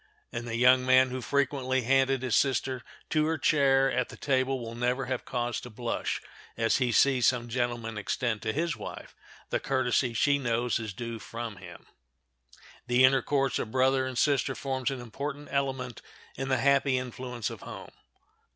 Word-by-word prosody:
And 120 - -5
the 115 - -3
young 125 +2 +5
man 130 0 +5
who 130 0 -4
frequently 130 -1 0
handed 135 +1 +2
his 125 -6 +1
sister 130 0 +1 0.3
to 155 -1 +2
her 160 0 0
chair 135 -2 +3
at 125 0 0
the - - -11
table 130 -1 0
will 115 -1 -6
never 125 +2 -1
have 130 0 -3
cause 120 -1 -2
to 125 - -9
blush 120 +1 -3 0.4
as 115 0 +2
he 125 -3 +1
sees 125 0 +4
some 120 -2 +1
gentleman 120 -2 -2
extend 110 +1 -2
to 110 - -1
his 165 +6 -1
wife - - -8 0.4
the - - +1
courtesy 125 -2 0
she 140 +4 +3
knows 120 -2 0
is 110 -2 -5
due 115 0 -5
from 115 -1 -6
him. 90 -1 -12 1.0
The 125 +1 +4
intercourse 135 +1 +2
of - - -3
brother 130 +2 +2
and 130 -2 -5
sister 135 -1 +2
forms 130 -1 -2
an 135 -2 -4
important 140 +5 -6
element 130 -3 -2 0.3
in 135 +1 -4
the 130 - +3
happy 140 -1 +3
influence 125 -2 -4
of - - -9
home. - - -9
130 Hz, 175 wpm, -28 LUFS, 120-135 Hz, 1.0 s, young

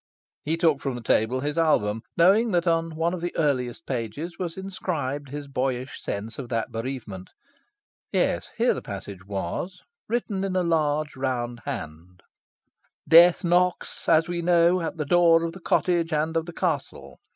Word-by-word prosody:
He 160 +2 -1
took 160 -4 +2
from 135 -3 -2
the 120 - -7
table 115 +4 +1
his 145 +3 -1
album, 110 -9 +2 0.2
knowing 200 +7 +5
that 175 0 +2
on 165 -1 0
one 165 +2 0
of 180 - -4
the 175 0 -4
earliest 135 -2 0
pages 135 +8 -4
was 175 -2 -4
inscribed 155 -8 -4
his 145 +1 -6
boyish 130 -1 -3
sense 105 +5 -5
of 125 -3 -6
that 115 -2 -2
bereavement. 115 -6 -6 0.8
Yes, - - 0
here 235 +2 +3
the - - -5
passage 100 -1 -8
was, 100 - -4 0.3
written 215 -4 -1
in 190 -1 -2
a 185 - +2
large 155 -2 0
round 120 -2 -2
hand: 90 - -7 0.8
"Death 170 +3 +7
knocks, 180 +1 +1
as 160 -1 +5
we 175 0 -2
know, 175 +1 +4
at 165 - -4
the 150 - -2
door 165 +1 +5
of 165 - -2
the 190 - -10
cottage 170 -1 +1
and 155 +1 0
of 165 +1 0
the 175 - -7
castle. 135 - -3
155 Hz, 170 wpm, -25 LUFS, 125-170 Hz, 0.8 s, Death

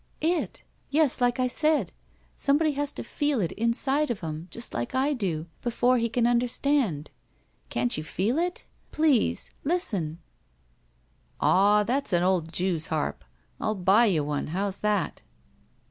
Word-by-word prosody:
''It! 335 +2 -1 0.3
Yes, 290 -4 +2
like 245 +1 +2
I 255 - +3
said. 295 - +1 0.4
Somebody 300 +3 +2
has 290 0 -2
to - - -6
feel 290 -4 -1
it 175 -5 0
inside 265 +6 +1
of 235 -5 -3
him, 160 0 -5
just 235 - -4
like 120 - -3
I 275 +3 +2
do, 175 - -2 0.2
before 245 +1 +2
he 230 0 0
can 235 +1 +1
under 240 +1 +2
stand. 240 - 0 0.6
Can't 120 0 0
you 155 - -3
feel 210 - -1
it? 355 +1 -2 0.3
Please! 305 -7 +1
Listen." 205 - -1 1.2
"Aw, 205 +2 +4
that's 260 +1 0
an 175 0 +3
old 180 -3 +1
jew's 175 -2 -1
harp. 155 -2 -2 0.4
Ill 215 - 0
buy 195 +5 +4
you 165 -7 +2
one. 145 0 -2
How's 195 +4 -2
that?" 210 -3 -1
230 Hz, 150 wpm, -27 LUFS, 175-275 Hz, 1.2 s, Aw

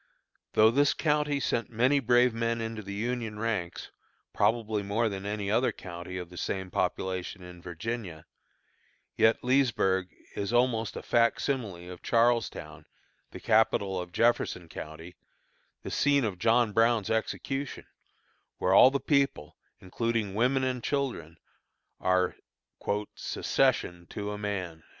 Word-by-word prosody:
Though 110 +1 +6
this 140 +3 +3
county 150 -2 +1
sent 115 -3 -1
many 125 +5 +3
brave 120 -1 +4
men 115 0 -1
into 115 -1 -4
the 100 -1 -7
Union 115 0 -3
ranks, 105 -6 -3 0.4
probably 110 -2 +1
more 105 +3 0
than 100 0 -5
any 105 -1 -2
other 120 +4 +2
county 90 0 -8
of 90 -1 -7
the 90 - -11
same 95 0 -3
population 95 +1 -2
in 90 -1 -11
Virginia, 90 -1 -5 0.9
yet 110 - +3
Leesburg 115 -8 +2 0.3
is 100 +1 -2
almost 120 -2 +1
a - - -6
fac 115 -1 +2
simile 100 -11 -3
of 90 - -10
Charlestown, 115 -10 0 0.4
the - - -9
capital 100 -4 +2
of 90 0 -8
Jefferson 90 -4 +1
County, 80 +2 -9 0.7
the - - -6
scene 140 -3 +3
of 95 -5 -3
John 115 +1 +3
Brown's 115 -1 +2
execution, 135 +4 -3 0.7
where 95 - +1
all 125 - +9
the 140 +1 -1
people, 140 - 0 0.3
including 110 +1 -2
women 130 +5 +2
and 125 -2 -2
children, 125 - -2 0.6
are 95 -1 +1 0.8
"secession 85 -1 0
to 105 0 -4
a 105 - -4
man." 95 -6 -4
110 Hz, 135 wpm, -29 LUFS, 95-120 Hz, 0.9 s, all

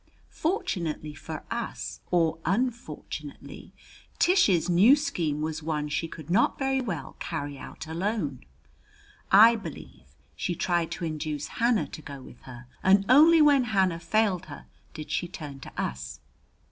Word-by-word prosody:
Fortunately 170 - -2
for 155 +2 -8
us, 235 -1 -4
or 165 -2 +2
unfortunately, 235 +7 -4 0.5
Tish's 210 - +3
new 190 +10 +6
scheme 170 - -2
was 155 0 -3
one 150 -1 -2
she 165 +2 -1
could 155 -2 -10
not 215 +6 +3
very 270 -1 0
well 205 -9 -5
carry 145 -4 -4
out - - -9
alone. 165 - -3 0.9
I 225 +4 +8
believe 165 - -9 0.3
she 175 - -2
tried 175 -1 0
to 170 +2 -4
induce 155 -2 -4
Hannah 235 -2 +3
to 155 - -9
go 140 -3 -9
with 130 - -14
her, 125 0 -10 0.2
and 195 +1 +4
only 310 +4 +7
when 285 -4 +5
Hannah 190 -6 +1
failed 200 -2 0
her 145 - -10 0.3
did 155 -1 -7
she 175 - -1
turn 150 -5 -8
to - - -10
us. 65 0 -4
170 Hz, 145 wpm, -27 LUFS, 155-225 Hz, 0.9 s, I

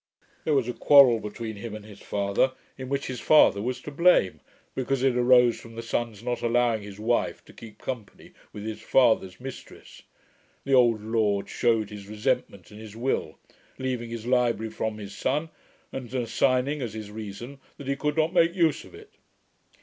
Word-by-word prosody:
There 155 - +2
was 130 -4 +1
a 125 - -2
quarrel 130 -3 +6
between 110 +1 -6
him 110 +1 -6
and 105 -1 -9
his 105 -2 -13
father, 100 +6 0 0.2
in 130 -1 -8
which 140 0 -1
his 125 -2 -5
father 125 -9 +5
was 125 +3 -3
to 150 - -8
blame; 170 - +3 0.3
because 130 0 -1
it 130 -2 +3
arose 125 -1 +5
from 115 -1 -13
the 115 - -6
son's 115 -2 -3
not 125 0 -2
allowing 120 -1 +2
his 100 0 -10
wife 120 +3 -1
to - - -16
keep 110 -2 -12
company 125 -6 -7 0.2
with 105 0 -8
his 110 -1 -5
father's 110 -8 +2
mistress. 135 +1 -10 0.6
The 140 - -1
old 120 -4 +4
lord 110 -3 0
shewed 115 -3 +1
his 100 -1 -9
resentment 105 -3 -2
in 105 - -11
his 110 -1 -10
will 125 +4 -2 0.4
leaving 125 -3 -3
his 115 -1 -6
library 120 -3 +1
from 110 -1 -3
his 100 -2 -8
son, 150 +5 -1 0.4
and 125 -3 -6
assigning, 130 +4 +1
as 115 -3 -4
his 105 -2 -7
reason, 110 +6 -8 0.2
that 140 - -9
he 140 - 0
could 150 +2 -2
not 160 +2 +2
make 170 0 +3
use 165 -4 +2
of - - -14
it.' 425 0 -14
120 Hz, 185 wpm, -26 LUFS, 110-130 Hz, 0.6 s, quarrel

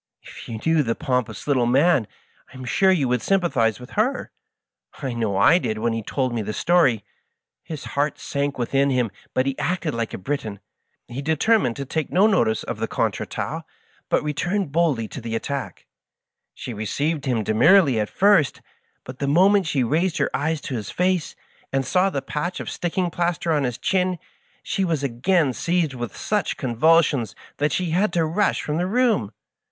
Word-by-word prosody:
If - - -11
you 110 -2 -5
knew 160 -1 +4
the 115 -4 -1
pomp 125 -3 -1
ous 110 - -9
little 130 -5 +2
man, 135 - +3 0.4
I - - -12
am 130 - -8
sure 190 +10 +3
you 155 -8 +2
would 125 -1 0
sympathize 135 - +1
with 125 +1 -12
her. 235 +6 -1 0.7
I 135 -4 -3
know 110 -4 -1
I 150 - +6
did 110 -10 -2
when 115 +1 0
he 115 - -2
told 130 +3 -2
me 115 - -1
the 105 0 -4
story. 140 - +3 0.7
SQs 155 -3 -5
heart 145 +2 -1
sank 140 0 -3
within 135 +3 +1
him, 125 -5 +1 0.2
but 130 - +2
he 135 -1 -1
acted 170 -3 -1
like 115 -1 -2
a - - -5
Briton. 110 -3 -4 0.5
He 125 +3 -6
determined 160 - +2
to 140 - -5
take 155 +3 -3
no 190 +4 +4
notice 120 - +2
of - - -5
the - - -1
contretemps^ - - -2 0.5
but - - +2
return 175 +5 -1
boldly 145 -7 +1
to 135 - -8
the 115 0 -4
attack. 115 -5 -4 0.7
She 120 - -6
received 140 +8 -2
him 120 -4 +1
demurely 135 - +4
at 105 - -1
first, 195 -8 +3 0.4
but 130 0 -10
the 140 - -1
moment 190 +5 +4
she 140 -5 +1
raised 160 +8 0
her - - 0
eyes 155 +2 -1
to 140 - -6
his 110 -5 -4
face, 180 -2 0 0.4
and 135 0 0
saw 180 +8 +2
the 140 -7 -3
patch 175 +5 -3
of - - -5
sticking 175 0 -2
plaster 170 0 -1
on 145 -3 +1
his 125 -1 -3
chin, 185 +5 0 0.5
she 195 - -1
was 165 -6 -1
again 140 +4 +1
seized 170 0 0
with 120 -3 -6
such 210 -5 -1
convulsions 140 - +2 0.2
that 145 +1 +1
she 180 0 -1
had 185 +4 +2
to 165 -2 +2
rush 175 +7 0
from 150 +1 -2
the 180 - 0
room. 220 - +1
145 Hz, 190 wpm, -23 LUFS, 120-175 Hz, 0.7 s, I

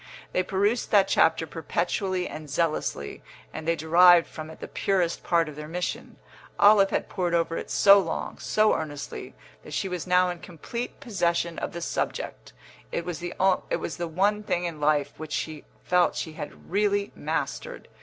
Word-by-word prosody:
They 185 - +2
perused 200 +5 0
that 200 -2 +5
chapter 165 -2 +3
perpetually 180 +4 -2
and 155 -1 -8
zealously, 155 - -2 0.3
and 160 - -6
they 165 - +3
derived 170 +2 +6
from 155 0 -8
it 160 - -12
the - - -7
purest 180 -4 0
part 170 -2 +2
of 150 - -8
their 150 0 -7
mission. 180 +3 -4 0.4
Olive 200 -1 +6
had - - -1
pored 175 -3 -1
over 165 0 0
it - - -5
so 200 0 +7
long, 165 -4 -4
so 215 0 +3
earnestly, 145 -3 -5 0.3
that - - -7
she - - -1
was 180 -1 -4
now 180 0 +4
in 175 - -7
complete 180 +9 -6
possession 175 - -1
of - - -3
the 170 - -5
subject; - - -3 0.4
it 170 - -2
was 175 -3 -4
the 175 -1 -1
one 200 +6 +1
thing 180 -4 -1
in 165 -3 -4
life 150 -1 +2
which 155 -2 -7
she 155 -1 -4 0.2
felt 180 -1 +3
she 160 - -4
had 155 +1 -9
really 205 0 +1
mastered. - - -4
175 Hz, 170 wpm, -26 LUFS, 160-195 Hz, 0.4 s, so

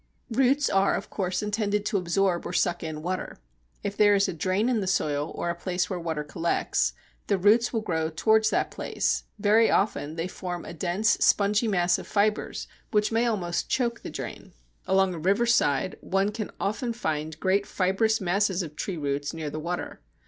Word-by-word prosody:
Roots 270 +4 +3
are 195 0 +3
of 200 - -5
course 185 0 -2
intended 210 0 -1
to 210 - +1
absorb 180 0 0
or - - -6
suck 175 -1 +1
in 155 -1 -5
water. 185 +2 -3 0.5
If 200 0 -3
there 205 -1 +5
is 200 0 +3
a 185 - -3
drain 185 +7 0
in 245 -3 +2
the 190 - -3
soil 150 -5 0
or 170 - -1
a - - -5
place 180 +2 -2
where 180 - -2
water 160 -3 -3
collects, 165 +3 0 0.3
the 200 - +2
roots 215 +5 +4
will 225 - -1
grow 160 -6 -1
towards 220 +6 +3
that - - 0
place. - - -1
Very 215 +2 +4
often 160 -6 0
they 165 +1 -2
form 180 -1 -6
a - - -7
dense 185 +6 +1
spongy 210 +3 +3
mass 175 -4 +2
of - - -9
fibres 210 +1 0 0.2
which 210 0 +1
may 230 +2 +2
almost 180 -7 -1
choke 235 -2 0
the - - -6
drain. - - -7 0.3
Along 190 -1 +3
a 170 - -6
riverside 190 - +2
one 195 +2 0
can 215 -1 -4
often 235 +4 -1
find 160 -7 -3
great 195 +2 +1
fibrous 205 +4 +1
masses 190 0 +1
of 155 -2 -8
tree 180 +4 -4
roots 145 +1 -2
near 155 -2 -4
the 155 - -4
water. 175 +3 -4
190 Hz, 190 wpm, -26 LUFS, 170-210 Hz, 0.5 s, there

